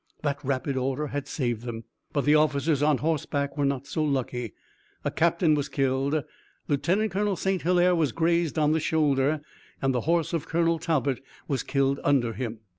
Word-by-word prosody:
That 145 0 -2
rapid 135 0 -1
order 135 +3 -1
had 145 0 -4
saved 120 -7 -2
them, 115 -1 -6 0.3
but 145 - 0
the 145 - +5
officers 150 -1 +2
on 150 -1 +3
horseback 145 -2 -1
were 145 -2 +1
not 140 -1 -1
so 155 - -2
lucky. 125 -5 -2 0.5
A - - +1
captain 170 -1 +2
was 145 -1 0
killed, 135 +2 0 0.4
Lieutenant 185 +9 +1
Colonel 200 +1 0
St. 190 +1 -1
Hilaire 180 +1 +3
was 160 -6 +1
grazed 170 +1 +1
on 150 -1 +3
the 160 - +2
shoulder, 150 -2 +1 0.4
and 135 -1 +1
the 125 - 0
horse 170 -1 +1
of 165 -4 -2
Colonel 165 0 +1
Talbot 140 -6 0 0.2
was 135 -3 0
killed 140 0 0
under 125 -5 +2
him. 115 -3 -5
145 Hz, 180 wpm, -26 LUFS, 135-165 Hz, 0.5 s, the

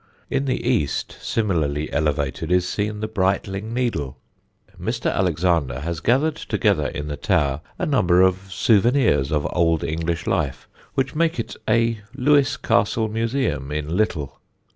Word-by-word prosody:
In 140 - 0
the 130 -2 -1
east, 115 - 0
similarly 75 -9 -1
elevated, 75 +1 -1
is 90 0 +3
seen 105 +2 -2
the 110 - -1
Brightling 100 +1 -1
Needle. 85 - -2 0.6
Mr. - - -1
Alexander 85 -7 +1
has 85 0 -3
gathered 135 - +2
together - - +1
in 75 -2 -5
the 75 - -3
tower 75 -8 +1 0.2
a - - -1
number 90 - +3
of 95 +1 +1
souvenirs 110 - +3
of 75 -2 0
old 85 -2 +2
English 80 +2 -2
life 70 -8 -1 0.3
which 135 -1 0
make 165 -3 +1
it 115 - -4
a 115 0 +2 0.2
Lewes 140 0 +3
Castle 110 +2 +1
museum 115 - -1
in 75 +2 -2
little. 85 -9 -1
95 Hz, 140 wpm, -22 LUFS, 75-115 Hz, 0.6 s, is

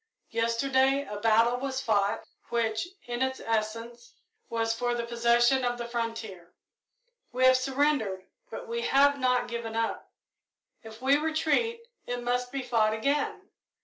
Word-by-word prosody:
Yesterday 260 +4 +2
a 205 0 -6
battle 230 +2 +3
was 265 0 -3
fought, 205 -5 +1 0.3
which, 225 +3 0 0.2
in 240 +1 -4
its 260 0 0
essence, 230 +2 -3 0.3
was 225 0 0
for 240 +1 -1
the 235 -1 -2
possession 235 +2 +3
of 245 0 0
the 235 0 -5
frontier. 225 -7 -5 0.8
We 255 +1 +2
have 260 0 +7
surrendered, 255 -7 0 0.2
but - - -7
we 470 0 -3
have 280 - +4
not 250 -1 +2
given 235 -1 -5
up. 225 0 -2 0.7
If 225 +2 -12
we 275 +2 +5
retreat, 320 +9 0 0.3
it 245 0 -3
must 245 +1 -1
be 275 -1 -3
fought 220 -3 +2
again. 380 - -1
240 Hz, 145 wpm, -28 LUFS, 230-270 Hz, 0.8 s, have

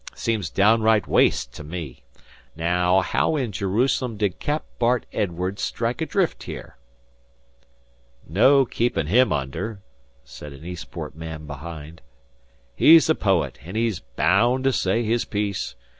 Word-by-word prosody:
'Seems 110 -7 -2
downright 110 +2 +3
waste - - +2
to - - -9
me.... 75 -5 -7 0.5
Naow, 90 +3 +2
how 125 - 0
in 130 -7 -1
Jerusalem 115 +5 0
did 100 -3 -1
Cap. 150 +1 -2
Bart 120 0 +2
Edwardes 90 +1 -2
strike 115 +4 -2
adrift 175 +2 0
here?" - - -8 1.5
"No 130 - +5
keepin' 120 -8 -1
him 120 +11 +3
under," 95 - -3 0.4
said 70 +3 -11
an 70 +4 -13
Eastport 85 -3 -7
man 80 -1 -7
behind. 80 +2 -9 0.7
"He's 160 - +7
a - - +5
poet, 95 - 0
an' 90 +6 -9
he's 115 -4 0 0.2
baound 125 +2 +3
to 135 0 +2
say 100 +2 +1
his 115 +1 0
piece. 100 -2 -3
100 Hz, 130 wpm, -23 LUFS, 80-120 Hz, 1.5 s, He's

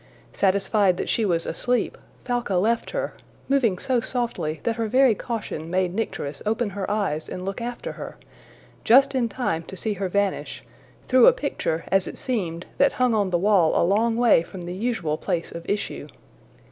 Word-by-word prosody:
Satisfied 195 -1 +2
that - - -3
she 225 - +1
was 170 -4 0
asleep, 245 +7 0 0.3
Falca 245 -5 -1
left 225 +6 +1
her, - - -3 0.3
moving 250 -9 +2
so 255 +5 +1
softly 230 - -2
that 230 0 -1
her 225 -1 -1
very 255 +1 +5
caution 210 -9 -5
made 180 0 0
Nycteris 150 -9 -4
open 220 0 -1
her 195 0 -4
eyes 200 -7 -1
and 180 - -6
look 195 +3 -4
after 240 +1 -5
her - - -8 0.7
just 275 +4 +6
in 245 -3 +1
time 200 -8 -2
to 190 - -9
see 215 +2 -2
her 195 -1 -3
vanish 200 +1 -1 0.4
through 255 0 +6
a - - +8
picture, 165 - -2
as 195 -1 +3
it - - -7
seemed, 180 -9 -2
that 280 - +4
hung 250 -2 +2
on 205 -3 +1
the 175 - +2
wall 185 -3 +3
a - - +3
long 225 +5 +2
way 240 -8 +5
from 175 +2 -9
the 175 +1 -5
usual 185 -7 -2
place 170 -1 -2
of 170 0 -8
issue. 205 0 -3
205 Hz, 185 wpm, -24 LUFS, 180-240 Hz, 0.7 s, a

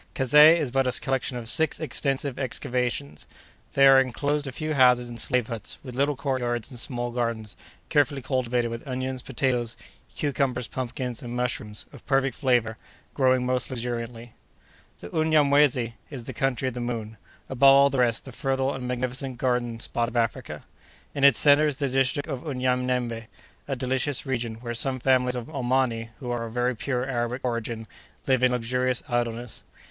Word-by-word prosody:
Kazeh 150 +5 +7
is 150 -7 -2
but 135 0 +2
a 125 - +2
collection 130 -1 -1
of 115 -2 -7
six 160 +6 +2
extensive 140 -3 -1
excavations. 125 - -2 0.5
There 135 0 +7
are - - +7
enclosed 145 +3 -1
a - - -4
few 155 +4 -3
houses 125 -3 +4
and 120 -1 -5
slave 125 -2 +2
huts, 115 -2 -5
with 130 -3 -8
little 140 +3 +1
courtyards 125 -3 -2
and 125 - -6
small 120 -1 -1
gardens, 115 -3 -3 0.3
carefully 140 -2 +2
cultivated 125 -2 0
with 115 +5 -7
onions, 130 0 -3
potatoes, 125 -2 -1 0.4
cucumbers, 135 -4 -1
pumpkins, 125 -1 -4
and 120 -1 -6
mushrooms, 125 -4 -3
of - - -13
perfect 135 -1 +1
flavor, 120 -5 +1 0.4
growing 130 -2 +2
most 125 -1 0
luxuriantly. 120 -2 -5 0.7
The 85 - -8
Unyamwezy 145 -6 +3 0.2
is 135 -5 -7
the 130 - -7
country 130 +1 -1
of - - -9
the 125 - -5
Moon—above 120 +2 -7
all 140 0 +8
the 135 - -1
rest, 120 -2 +1
the 135 - -9
fertile 135 +2 -1
and 125 -1 -5
magnificent 125 +1 -2
garden 120 -2 -1
spot 115 +1 -1
of 120 - -5
Africa. 115 -1 -2 0.5
In 140 - -3
its 140 -4 +7
centre 150 +1 +5
is 145 -3 -2
the 140 - 0
district 135 +3 +1
of 135 -5 -5
Unyanembe—a 125 -1 -3
delicious 130 +2 -1
region, 120 -4 -2
where 120 -1 -4
some 130 +2 -1
families 125 0 +2
of 120 -2 -4
Omani, 125 -4 -1
who 125 -4 -5
are 120 -1 -2
of 115 - -8
very 125 +1 0
pure 125 +2 -2
Arabic 125 0 -2
origin, 115 -2 -3 0.4
live 130 -2 +2
in 130 0 +4
luxurious 125 +1 0
idleness. 120 -1 -2
125 Hz, 170 wpm, -26 LUFS, 120-135 Hz, 0.7 s, all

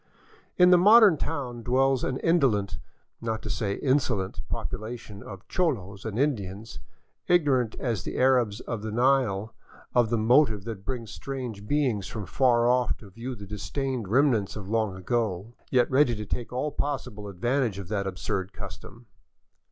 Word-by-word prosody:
In 180 0 +7
the 180 - +7
modern 210 -1 +7
town 135 -6 -4
dwells 130 +2 +2
an 130 - -1
indolent, 115 - +2 0.4
not 110 -1 -3
to 105 - -4
say 100 0 -1
insolent, 130 -8 0
popula 110 +3 -4
tion 105 -3 -12
of 100 0 -10
cholos 100 - -1
and 110 -1 -4
Indians, 110 -6 -2 0.5
ignorant 140 -10 +2
as 115 -8 -2
the - - -5
Arabs 125 -5 +3
of 115 -3 -5
the 110 0 -4
Nile 115 -4 +1 0.4
of 120 -3 +3
the 115 - +1
motive 110 -2 +3
that 105 -3 -7
brings 120 -5 -4
strange 125 -7 -6
beings 125 -9 0
from 105 -1 -6
far 120 +4 +3
off 125 -1 +2
to 100 -3 -14
view 120 +5 -6
the 100 -2 -9
disdained 115 +3 -3
remnants 115 -4 +2
of 105 -3 -7
long 110 -2 0
ago, 105 +1 -2 0.2
yet 125 -2 +3
ready 130 -2 +4
to 105 0 -5
take 120 +3 -4
all 130 +4 -2
possible 125 -9 -4
advantage 120 +3 -1
of 100 -3 -7
that 100 -2 -1
absurd 95 +1 -3
custom. 120 +1 -10
115 Hz, 160 wpm, -27 LUFS, 105-130 Hz, 0.5 s, In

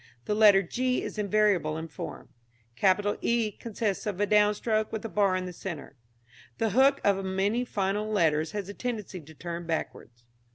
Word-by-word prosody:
Letter 210 -2 +6
g 250 +3 -1
is - - -5
invariable 200 -6 +2
in 160 +1 -5
form. 155 - -8 0.5
Capital 205 +4 +2
E 235 -2 +1
consists 210 -1 -3
of 200 -3 -3
a 205 - +3
downstroke 210 +1 +2
with 220 0 -4
a - - -3
bar 200 -3 +2
in 185 0 -2
the 180 - -6
centre. 160 -6 -7 0.6
The 225 -2 0
hook 270 +2 +4
of 195 -1 +2
many 195 +5 0
final 205 -1 -1
letters 160 -6 +2
has 205 -3 -4
a 200 - -7
tendency 210 -6 -5
to 160 +1 -15
turn 170 +1 -6
backwards. 120 -7 -5
205 Hz, 170 wpm, -28 LUFS, 180-215 Hz, 0.6 s, Letter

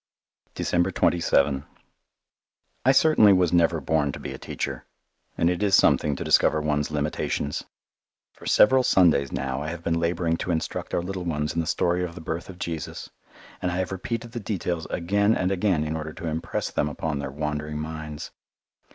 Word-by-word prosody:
December 85 +2 +1
27 75 -6 +2 1.2
I 130 - +6
certainly 135 -7 +6
was 90 -2 +2
never 85 -1 +3
born 75 0 +1
to - - -8
be - - -6
a - - -9
teacher - - -5 0.5
and 85 - +2
it 90 +2 0
is 100 -2 +4
something 75 -5 +3
to - - -4
discover 80 - +4
one's 75 -1 0
limitations. 75 -1 -2 0.7
For - - -11
several 130 +4 +6
Sundays 85 - +3
now 65 +1 -2
I 75 - -4
have 85 +1 -6
been 85 -1 0
labouring 85 0 0
to - - -5
instruct 80 -2 -2
our 85 - 0
little 95 0 -4
ones 75 -2 -1
in - - -1
the 80 - -5
story 90 +1 +1
of 85 -1 -5
the - - -8
birth 80 +3 -4
of 95 - -9
Jesus, 85 -3 -5 0.5
and 90 - 0
I 90 - -2
have 95 0 -2
repeated 115 +5 -4
the 120 - -4
details 90 -6 -3
again 100 +5 +2
and 95 +1 0
again 95 -4 +1
in 75 +1 -3
order 80 0 -5
to - - -8
impress 80 0 -3
them 75 - 0
upon 75 0 -3
their 70 - -4
wandering 75 +1 -3
minds. 75 -1 -6
85 Hz, 185 wpm, -25 LUFS, 75-90 Hz, 1.2 s, I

